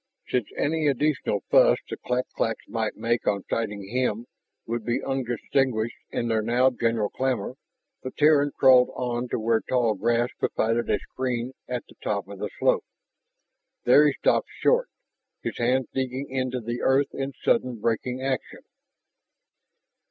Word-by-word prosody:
Since 125 -4 0
any 155 +1 +1
additional 140 -7 +1
fuss - - +6
the - - -4
clak 125 +1 -2
claks 115 -1 -2
might 110 -2 -2
make 120 +1 -1
on 100 -1 +1
sighting 105 -3 -3
him 120 0 -1 0.4
would 115 0 -3
be 120 +2 -1
undistinguished 125 -2 -1
in 120 - -2
their 110 -1 +1
now 120 +4 +3
general 115 -4 0
clamor, 130 -4 -1 0.5
the 130 - -5
Terran 145 0 +4
crawled 130 -2 +6
on 125 -1 -2
to - - -1
where 115 0 +2
tall 120 -4 +1
grass 120 +4 +1
provided 115 +1 0
a - - +3
screen 125 -1 -3
at 125 -1 -3
the - - -16
top 100 -2 -1
of 100 -1 -10
the - - -3
slope. - - +2 1.0
There 145 +5 +6
he 145 - +2
stopped - - +1
short, - - +3 0.5
his - - -4
hands 125 +2 +2
digging 130 +1 -3
into 130 -1 -2
the 120 +2 -4
earth 135 +2 +2
in 135 0 -3
sudden 120 -1 +1
braking 125 +4 -1
action. 135 -1 -3
125 Hz, 150 wpm, -25 LUFS, 115-130 Hz, 1.0 s, fuss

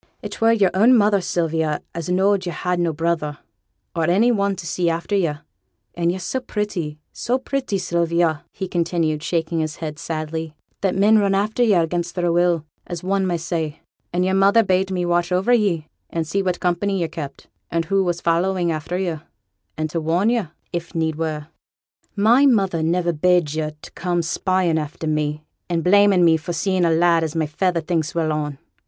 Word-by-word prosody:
'It - - -7
were 225 0 +5
yo'r 205 -5 +3
own 230 +7 +5
mother, 205 -2 +3
Sylvia, 160 -3 -1
as 170 0 -5
knowed 190 +1 +2
yo' - - -1
had 180 +1 -2
no 170 -1 +1
brother, 155 -1 -1 0.6
or 165 -1 +1
any 200 +9 +3
one 200 -3 +1
to 175 - -8
see 170 +1 0
after 170 +5 -2
yo'; 170 -6 +1 0.6
and 170 0 0
yo' 180 - -3
so 190 +8 -3
pretty, 205 -10 -3 0.2
so 250 +2 -1
pretty, 265 -5 -2
Sylvia,' 170 -3 0
he 190 - -5
continued, 165 -3 0
shaking 165 0 -1
his 155 -1 -2
head, 155 -2 -6
sadly, 160 -1 -4 0.3
'that 195 -2 +1
men 210 +3 +5
run 200 -1 +2
after 215 +4 0
yo' 200 -7 +4
against 175 +1 -3
their 175 -2 +1
will, 170 -2 +2 0.2
as 175 -1 -6
one 190 0 +1
may 175 -1 0
say; 160 -2 -3 0.3
and 180 +1 +1
yo'r 190 - +1
mother 200 +4 +5
bade 190 -1 +1
me 180 -2 -1
watch 175 0 +1
o'er 185 +6 +2
ye 190 -9 +1 0.2
and 165 -1 -2
see 195 +5 -1
what 180 -2 -1
company 185 +2 0
yo' 170 - 0
kept, 150 -3 -7 0.2
and 165 -1 -1
who 195 +2 +2
was 175 -1 -2
following 175 +1 +1
after 160 +3 -3
yo', 175 -4 -2 0.6
and 155 0 -2
to 165 - -2
warn 175 +8 +2
yo', 230 -7 0 0.3
if 175 +1 -5
need 160 -1 0
were.' 155 -2 -3 0.7
'My 235 +7 +5
mother 195 -9 +2
niver 170 +2 +1
bade 175 -1 +2
yo' 155 -1 -1
to - - -10
come 175 -1 -1
spying 175 0 +1
after 155 +1 -6
me, 150 -1 -1 0.3
and 170 -2 0
blaming 200 -1 +5
me 165 -1 +5
for 165 +2 -5
seeing 185 +1 +1
a - - +3
lad 165 0 +3
as 160 0 -3
my 160 -1 +1
feyther 170 +3 0
thinks 160 0 -2
well 160 -2 +1
on. 150 -2 -3
175 Hz, 195 wpm, -21 LUFS, 160-190 Hz, 0.7 s, were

